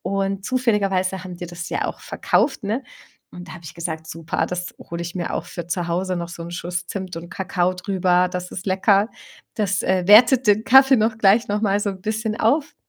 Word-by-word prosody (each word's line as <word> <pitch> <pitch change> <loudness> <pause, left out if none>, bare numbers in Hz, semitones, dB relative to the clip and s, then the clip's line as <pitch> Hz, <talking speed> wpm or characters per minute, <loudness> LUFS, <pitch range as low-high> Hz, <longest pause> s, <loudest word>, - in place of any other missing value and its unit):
Und 195 0 -2
zufälligerweise 195 -7 0
haben 180 -1 -8
die 175 - -7
das 175 0 -7
ja - - -2
auch - - -4
verkauft, 270 - 0
ne? 220 +6 -2 0.5
Und 180 0 -11
da - - -9
hab 170 -2 -12
ich 155 - -9
gesagt: 160 -1 -5
„Super, 165 +1 -3
das 180 0 -5
hol 170 0 -7
ich 170 +1 -5
mir 175 - -3
auch - - -3
für 175 -1 -7
zu 175 0 -2
Hause 185 +2 -1
noch 170 -1 -4
so 170 -1 -8
'n 170 - -8
Schuss 175 0 -4
Zimt 185 -2 -6
und 170 +1 -8
Kakao 185 -2 -1
drüber.“ 180 -1 +1
Das 180 0 -5
ist 185 - -6
lecker. 195 +3 +3 0.4
Das, 200 -3 0
äh, 185 -1 +1
wertet 235 +5 +7
den 210 +1 +4
Kaffee 265 +1 +7
noch 220 0 +1
gleich 215 +3 +4
noch 205 +1 0
mal 205 -1 +1
so 205 - -1
'n 190 -1 -9
bisschen 215 +2 -3
auf. 285 +8 +1
190 Hz, 220 wpm, -22 LUFS, 175-210 Hz, 0.5 s, wertet